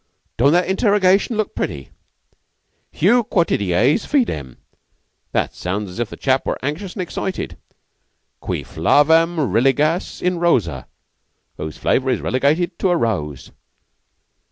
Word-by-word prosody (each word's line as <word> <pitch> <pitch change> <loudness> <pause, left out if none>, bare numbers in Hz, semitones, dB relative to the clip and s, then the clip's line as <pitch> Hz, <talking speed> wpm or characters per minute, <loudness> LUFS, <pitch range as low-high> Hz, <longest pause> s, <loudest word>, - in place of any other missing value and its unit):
"Don't 140 +5 +3
that 180 +1 +2
interrogation 200 +2 +2
look 215 - -1
pretty? 70 -2 -4 1.0
Heu 235 +8 +3
quoties 125 - +1
fidem! 75 - -1 0.7
That - - -1
sounds 95 +2 -4
as 90 - -9
if 120 - -2
the - - -9
chap 130 -1 +1
were - - -1
anxious 175 +7 -4
an' 190 - -2
excited. 185 +1 -4 0.8
Cui - - -4
flavam 160 - +3 0.2
religas 145 - +1
in 180 -1 -1
rosa 85 - +1 0.7
Whose 75 0 -6
flavor 130 0 +1
is 125 - +1
relegated 155 +7 0
to 190 - +1
a 175 - +2
rose. 75 - -3
150 Hz, 125 wpm, -20 LUFS, -, 1.0 s, Don't